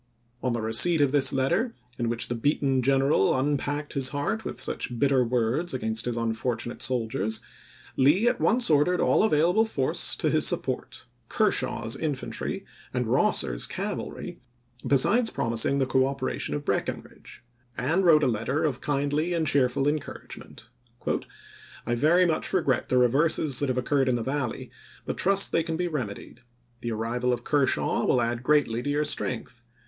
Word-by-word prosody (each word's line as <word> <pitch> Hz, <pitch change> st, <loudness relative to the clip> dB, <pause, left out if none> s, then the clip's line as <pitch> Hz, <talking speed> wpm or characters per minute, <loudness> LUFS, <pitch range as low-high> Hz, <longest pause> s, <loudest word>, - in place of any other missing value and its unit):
On 125 Hz, -, -1 dB
the 115 Hz, -2 st, -3 dB
receipt 160 Hz, +10 st, +6 dB
of 140 Hz, -2 st, +3 dB
this 145 Hz, -2 st, +3 dB
letter, 175 Hz, -, 0 dB, 0.2 s
in 120 Hz, -1 st, 0 dB
which 120 Hz, 0 st, -1 dB
the -, -, -2 dB
beaten 135 Hz, +1 st, 0 dB
general 135 Hz, -3 st, +2 dB
unpacked 145 Hz, +1 st, -2 dB
his 135 Hz, -2 st, 0 dB
heart 150 Hz, +11 st, -2 dB
with -, -, -6 dB
such 120 Hz, -, -4 dB
bitter 135 Hz, -1 st, +3 dB
words 125 Hz, +6 st, -1 dB
against 110 Hz, -2 st, -1 dB
his 120 Hz, -1 st, -2 dB
unfortunate 115 Hz, +1 st, -3 dB
soldiers, 110 Hz, -3 st, -2 dB, 0.6 s
Lee 155 Hz, -, +3 dB
at -, -, +1 dB
once 235 Hz, -5 st, +3 dB
ordered 155 Hz, +5 st, +3 dB
all -, -, +3 dB
available 180 Hz, +2 st, +3 dB
force 140 Hz, -12 st, -1 dB
to -, -, -1 dB
his -, -, +2 dB
support, -, -, -3 dB, 0.2 s
Ker -, -, +2 dB
shaw's 115 Hz, -1 st, -2 dB
infantry 150 Hz, -5 st, -4 dB, 0.3 s
and -, -, -1 dB
Kosser's -, -, +1 dB
cavalry, -, -, -5 dB, 0.5 s
besides 220 Hz, -, +4 dB
promising 115 Hz, -, +1 dB
the 135 Hz, -, +1 dB
cooperation 130 Hz, 0 st, -1 dB
of 145 Hz, 0 st, -5 dB
Breckinridge; -, -, -4 dB, 0.3 s
and 165 Hz, +9 st, +1 dB
wrote 155 Hz, -4 st, +5 dB
a -, -, +3 dB
letter 125 Hz, +7 st, -1 dB
of 145 Hz, -5 st, -1 dB
kindly 145 Hz, +4 st, -1 dB
and 165 Hz, -1 st, 0 dB
cheerful 135 Hz, -1 st, +1 dB
encourage 150 Hz, 0 st, -4 dB
ment. -, -, -14 dB, 0.6 s
" -, -, -20 dB
I 120 Hz, -, -1 dB
very 160 Hz, +9 st, +3 dB
much 160 Hz, +1 st, -1 dB
regret 150 Hz, -9 st, 0 dB
the 130 Hz, -, +2 dB
reverses 135 Hz, +2 st, +2 dB
that 145 Hz, -, -1 dB
have 130 Hz, -, -1 dB
occurred 135 Hz, +1 st, +1 dB
in 125 Hz, -, +2 dB
the 120 Hz, -, -2 dB
Valley, 135 Hz, -1 st, -3 dB, 0.3 s
but -, -, -4 dB
trust 195 Hz, +1 st, +2 dB
they 165 Hz, -, +2 dB
can 165 Hz, 0 st, -3 dB
be 180 Hz, +1 st, -1 dB
rem 145 Hz, -10 st, -3 dB
edied. 100 Hz, +3 st, -11 dB, 0.4 s
The 120 Hz, -, -3 dB
arrival 120 Hz, +3 st, -1 dB
of 120 Hz, -1 st, -2 dB
Kershaw 145 Hz, -1 st, +1 dB
will 125 Hz, -, +2 dB
add 120 Hz, 0 st, -1 dB
greatly 125 Hz, -4 st, +1 dB
to 145 Hz, -, -4 dB
your 150 Hz, +1 st, 0 dB
strength. 120 Hz, -2 st, -3 dB
135 Hz, 170 wpm, -26 LUFS, 120-150 Hz, 0.6 s, receipt